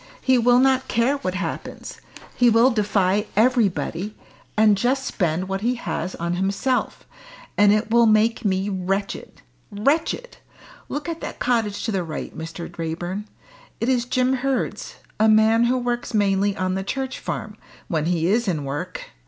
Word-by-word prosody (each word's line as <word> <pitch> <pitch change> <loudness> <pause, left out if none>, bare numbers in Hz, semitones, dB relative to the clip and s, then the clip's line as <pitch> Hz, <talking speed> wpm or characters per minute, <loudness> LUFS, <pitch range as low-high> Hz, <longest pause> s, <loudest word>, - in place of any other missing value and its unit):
He 260 -2 +3
will 245 +1 +5
not 260 0 +3
care 250 +4 +1
what 185 -9 -3
happens. 175 -4 -5 0.3
He 245 -1 +5
will 230 +3 +5
defy 205 -2 +1
everybody, 210 -4 +1 0.4
and 215 -1 +5
just 255 +6 0
spend 180 -3 -1
what 195 0 -3
he 245 +3 +1
has 185 -4 -4
on 170 +1 -2
himself. 200 +7 -1 0.5
And 205 0 +5
it 215 +1 +1
will 235 0 +5
make 220 +2 +3
me 190 -1 0
wretched 195 - -3 0.3
wretched. 295 - 0 0.5
Look 295 +2 -4
at 330 -1 -4
that - - -6
cottage 225 -5 0
to 225 - -1
the 190 -3 -1
right, 160 -2 -6
Mr. 165 +1 -6
Raeburn. 175 +5 -4 0.5
It 230 - 0
is 245 -2 +2
Jim 255 +1 +1
Hurd's 265 0 -2 0.2
a 220 0 +5
man 220 +2 +5
who 250 +2 +2
works 245 -1 -2
mainly 200 -1 +2
on 185 0 -1
the 190 +1 -2
Church 265 +5 -3
Farm, 210 -1 -5 0.3
when 155 -3 -1
he 165 -1 0
is 220 +5 +2
in 160 -6 -1
work. 140 +1 -5
215 Hz, 160 wpm, -23 LUFS, 190-245 Hz, 0.5 s, will